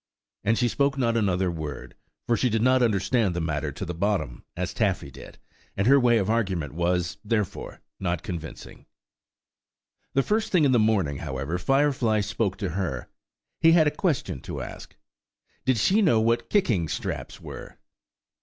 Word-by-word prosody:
And 115 +2 +2
she 125 - +2
spoke 140 +3 +1
not 115 -3 +1
another 95 -4 +1
word, 80 -3 -6 0.3
for 120 - +2
she 125 - +1
did 110 0 0
not 130 0 +4
understand 110 -2 +2
the - - -1
matter 80 -2 -2
to 95 - -6
the 85 - -4
bottom, 85 -9 -1
as - - -2
Taffy - - 0
did, - - -12 0.4
and 100 - +1
her 140 +3 +6
way 120 -2 +4
of 100 -3 0
argument 95 -10 -1
was, 90 +1 0
therefore, 105 -3 -2 0.2
not 85 -3 -2
convincing. 80 -3 -8 1.3
The 135 - +4
first 220 +5 0
thing 180 -5 +4
in 135 - +4
the 125 - +4
morning, 100 -10 +2
however, 70 +3 -3
Firefly 130 -3 +2
spoke 100 -1 -1
to 100 -4 -2
her. 80 -8 -3 0.5
He 165 0 +6
had 165 -2 +6
a 150 - +3
question 130 - -1
to - - -5
ask. - - -10 0.7
Did 130 -2 +3
she 195 - +3
know 140 - +4
what 115 +1 +1
kicking 115 - +2
straps - - -4
were? - - -9
105 Hz, 170 wpm, -26 LUFS, 85-125 Hz, 1.3 s, her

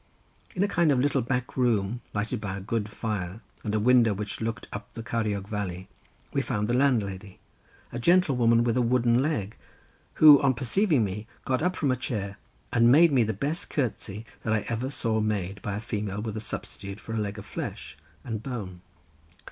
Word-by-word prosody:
In 185 - +2
a - - +2
kind 170 -5 +3
of 130 - +3
little 140 0 +2
back 125 +1 -2
room, 120 -2 +1
lighted 105 +2 -2
by 100 -1 -3
a - - -5
good 105 +2 -2
fire 105 -2 -4 0.2
and 105 -1 -1
a - - +2
window, 115 -2 +4
which 105 +2 -5
looked 110 -2 -3
up 105 +1 -7
the 115 - -6
Ceiriog 105 -4 -2
valley, 95 -4 -4 0.4
we - - +2
found 105 0 -1
the 120 - 0
landlady, 105 -8 0 0.5
a 120 - -4
gentlewoman 125 -7 +4
with 120 -1 +1
a 125 - +3
wooden 120 0 +3
leg, 115 -9 -1 0.6
who 150 -2 +9
on 135 -3 +3
perceiving 140 - +2
me 105 +2 -4 0.2
got 130 0 0
up 180 +2 +1
from 145 -6 +1
a - - +2
chair, 100 -6 -4 0.3
and 120 0 +5
made 160 +4 +7
me 130 -3 +4
the 110 - 0
best 140 - -3
curtsey 115 -5 -3 0.2
that 110 - 0
I 105 -2 0
ever 115 +3 -2
saw 115 -5 -1
made 100 -3 -2
by 100 - -3
a - - -3
female 105 -2 -3
with 110 0 -4
such 110 - -4
a - - -6
substitute 100 +1 -6
for 110 - -7
a 115 - -1
leg 105 0 -3
of 105 - -8
flesh 65 - -6 0.3
and 110 -3 -4
bone. 105 -9 -6
115 Hz, 200 wpm, -27 LUFS, 105-125 Hz, 0.6 s, who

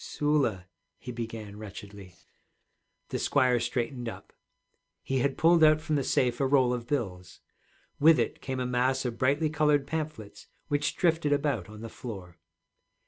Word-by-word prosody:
'Sula,' 140 -11 0 0.3
he 125 - -8
began 115 -3 -6
wretchedly. 100 -3 -10 0.9
The - - -2
squire 130 -3 +3
straightened 120 0 -2
up. - - -11 0.7
He 135 0 -1
had 135 +2 0
pulled 165 0 +5
out 155 0 +6
from 155 0 -2
the 140 - +1
safe 125 -1 +1
a 135 - +3
roll 130 -3 +3
of 120 -1 -4
bills. 95 -11 -3 0.6
With 160 +1 +7
it 120 - -1
came 130 -1 -4
a 125 - -1
mass 130 +1 +1
of 120 -2 -3
brightly 145 +4 +2
colored 150 -2 +2
pamphlets 150 -8 -5 0.2
which 145 0 0
drifted 165 -4 +2
about 140 - -1
on 105 0 -10
the 115 - -6
floor. 95 -8 -9
130 Hz, 155 wpm, -28 LUFS, 115-145 Hz, 0.9 s, With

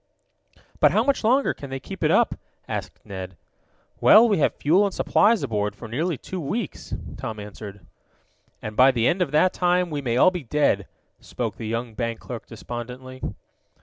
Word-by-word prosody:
"But 150 +1 +5
how 215 +3 +3
much 275 -1 +1
longer 260 +5 +3
can 140 - -9
they 135 0 -4
keep - - -8
it - - +3
up?" - - +3 0.3
asked - - -5
Ned. 95 -3 -7 0.6
"Well, 225 +2 +7
we 205 -6 +2
have - - +2
fuel 175 +8 +3
and 200 - +1
supplies 215 +1 +3
aboard 105 -5 -1
for 115 - -9
nearly 155 +8 -1
two 185 - -6
weeks," 175 +5 -4 0.2
Tom 110 -1 -5
answered. 100 -1 -9 0.8
"And 110 -1 -5
by 130 +3 +7
the 120 -3 +1
end 180 +2 +1
of 180 - +1
that 155 +6 +3
time 180 -1 +1
we 145 -1 -2
may 120 -3 -1
all 185 - +6
be 180 -2 -4
dead," 130 - +1 0.3
spoke - - -5
the 110 - -5
young 115 +1 -3
bank 115 0 -3
clerk 120 -3 -8
despondently. 125 +3 -8
130 Hz, 180 wpm, -24 LUFS, 115-180 Hz, 0.8 s, Well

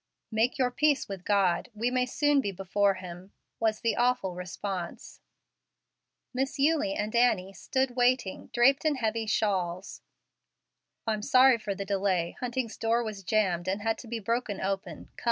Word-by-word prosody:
"Make 225 +5 +1
your 255 -2 +1
peace 295 +2 +2
with 195 -3 -7
God. 190 -4 +1
We 235 +3 0
may 250 0 +1
soon 290 +2 +2
be 200 - -2
before 195 +1 +1
Him," 185 +1 -10 0.3
was 220 -1 0
the 230 - +1
awful 245 -6 +1
response. 180 0 -6 1.1
Miss 265 +2 -2
Eulie 295 +1 +2
and 215 0 -3
Annie 205 -6 +2
stood 260 +4 -1
waiting, 245 -5 +1
draped 270 +5 +4
in 310 -2 +2
heavy 225 -3 -1
shawls. 190 -4 -1 1.0
"I'm 215 -2 -1
sorry 255 +2 +5
for 205 -2 -3
the 200 - -5
delay; 190 -3 0
Hunting's 245 -2 -3
door 230 +1 +1
was 215 -3 -5
jammed 185 -4 +1
and 195 +2 -1
had 225 0 0
to 240 - -10
be 235 +1 -3
broken 225 -1 -2
open. 190 -4 -4
220 Hz, 155 wpm, -28 LUFS, 195-250 Hz, 1.1 s, sorry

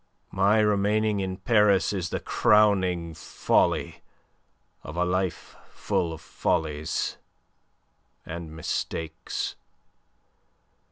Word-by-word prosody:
My 100 +3 +3
remaining 105 0 +2
in 95 -1 -3
Paris 105 -2 +3
is 90 -3 -2
the - - -2
crowning 95 -6 +2
folly - - 0 0.8
of 75 +4 -9
a 90 - +2
life 90 0 -2
full 85 -2 -1
of 80 0 -8
follies 75 -1 -2 1.1
and 85 -1 -7
mistakes. 80 0 -4
95 Hz, 90 wpm, -26 LUFS, 80-105 Hz, 1.1 s, My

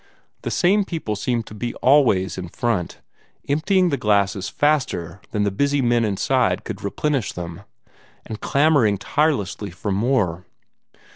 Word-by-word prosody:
The - - -3
same 200 +3 +3
people 160 - -4
seemed 115 +2 -1
to - - -11
be 120 +3 -4
always 125 -9 +3
in 90 -2 -6
front, 105 -4 -2 0.5
emptying 180 +6 +2
the 140 - 0
glasses 100 -2 +1
faster 130 - 0
than 105 - -1
the 100 - +1
busy 140 +8 +1
men 120 -2 +2
inside 100 -3 +1
could - - -7
replenish 135 +4 -1
them, 85 +1 -7 0.6
and 110 - -7
clamoring 140 -8 +3
tirelessly 105 - -1
for 95 +4 -5
more. 95 -5 0
115 Hz, 140 wpm, -22 LUFS, 100-145 Hz, 0.6 s, same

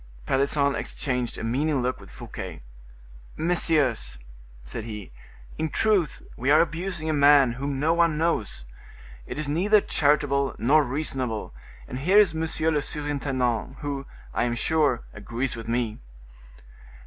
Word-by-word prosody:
Pelisson 140 - +2
exchanged 125 -5 -3
a - - -5
meaning 135 +4 0
look 125 +1 -1
with - - -13
Fouquet. - - -8 0.7
"Messieurs," 150 - +1 0.5
said 65 - -6
he, 105 - -7 0.5
"in 160 0 0
truth 200 -8 +1
we 130 +3 -2
are 150 +2 +7
abusing 170 0 -1
a 155 - +1
man 140 -3 +6
whom 135 +3 -3
no 160 +3 +3
one 170 -2 +3
knows: 135 - -1 0.6
it - - -6
is 155 -1 -2
neither 190 +9 +4
charitable 140 - +1
nor 145 +6 +4
reasonable; 130 -5 -3 0.3
and 125 - -5
here 185 +9 +3
is 205 -6 +6
monsieur 160 0 0
le 150 -2 +1
surintendant, 135 -5 -2
who, 140 -2 -4 0.3
I - - +1
am 120 -1 -1
sure, 145 -2 +1
agrees 120 +5 -3
with 115 -1 -8
me." 115 -2 -1
140 Hz, 140 wpm, -26 LUFS, 125-155 Hz, 0.7 s, are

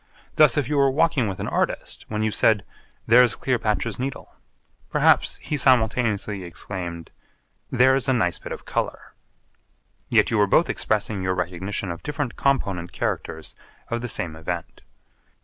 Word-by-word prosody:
Thus 150 -5 +5
if 145 -4 +1
you 150 0 0
were 140 0 +5
walking 145 -3 +2
with 95 -2 -5
an - - -3
artist, - - -2
when 105 0 -2
you 110 - +1
said 105 -1 +2 0.4
'There's 120 +1 +5
Cleopatra's 115 -4 -1
Needle,' 135 +1 -5 0.6
perhaps - - +3
he 150 - -2
simultaneously 110 -6 +2
exclaimed 85 -1 -6 0.6
'There's 130 +2 +3
a - - +4
nice 90 -8 0
bit - - -9
of - - -7
colour.' - - -3 1.0
Yet - - +3
you 110 - +2
were 100 - +4
both 165 - +3
expressing 105 -2 -1
your 95 0 0
recognition 90 +2 -3
of 85 - -7
different 145 -4 -3
component 100 -11 0
characters 80 0 -3 0.4
of 115 0 -2
the 120 - -3
same 85 -7 -3
event. 85 +2 -6
110 Hz, 150 wpm, -24 LUFS, 95-130 Hz, 1.0 s, Thus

